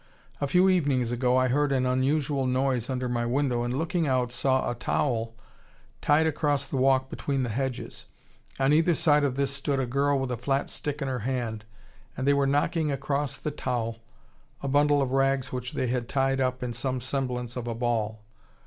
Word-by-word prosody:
A 140 - +1
few 180 +6 +4
evenings 140 -10 +2
ago 125 +1 +2
I 130 0 +3
heard 145 +2 +2
an 130 -2 +2
unusual 135 +1 +1
noise 130 -1 0
under 130 -1 -1
my 120 -1 -1
window, 125 0 0
and, 120 +2 -2
looking 165 +1 0
out, 125 -2 +1
saw 130 +1 +1
a - - 0
towel 115 -2 -1 0.7
tied 150 +2 +3
across 145 -2 0
the 135 - -4
walk 130 0 +3
between 135 0 -2
the 120 - -2
hedges. 130 +2 -4 0.5
On 135 +2 +3
either 165 +2 +4
side 150 -1 +3
of 135 -3 0
this 140 0 0
stood 140 0 -2
a 130 - +1
girl 140 +3 +1
with 135 -1 -2
a 125 - -2
flat 135 +4 -1
stick 145 0 -4
in - - -3
her 130 -1 -2
hand, 115 -3 -3 0.5
and 130 +2 -2
they 140 - +6
were 140 -1 +2
knocking 150 +2 +1
across 140 0 -2
the 150 - -4
towel 120 -5 -3 0.6
a - - -1
bundle 145 +1 +3
of 130 - -3
rags 135 0 +1
which 125 0 -4
they - - -1
had 120 -1 -2
tied 135 0 +1
up 130 -1 -1
in 120 -1 -3
some 130 +2 -2
semblance 125 -2 -3
of 120 -1 -4
a 115 - -2
ball. 110 -2 -1
130 Hz, 200 wpm, -27 LUFS, 125-140 Hz, 0.7 s, they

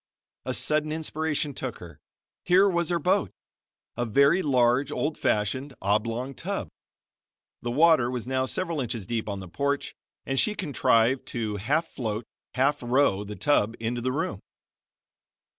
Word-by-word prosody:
A 130 - 0
sudden 155 0 +1
inspiration 155 -2 -2
took 130 -3 -5
her. 85 -4 -12 0.4
Here 190 +3 +5
was 175 -3 0
her 175 - +2
boat! 165 - +1 0.7
a 120 - -1
very 140 - +4
large, 130 -1 +2
old 150 +1 -1
fashioned, 130 +6 -1
oblong 115 +6 -1
tub. - - -4 0.9
The 120 - -3
water 150 -1 +4
was 125 -2 -4
now 130 0 0
several 170 -3 -2
inches 115 -4 -3
deep 115 +1 -3
on 100 -1 -4
the 95 - -8
porch 140 +9 -2 0.3
and 135 0 0
she 210 - +2
contrived 130 - +2
to 110 -3 -3
half 145 - 0
float, 110 -5 -4 0.3
half 135 +3 +2
row 120 -5 +2
the 105 0 -7
tub 115 -6 +2
into 120 +2 -2
the 130 +2 0
room. 130 -8 -2
130 Hz, 150 wpm, -26 LUFS, 115-150 Hz, 0.9 s, Here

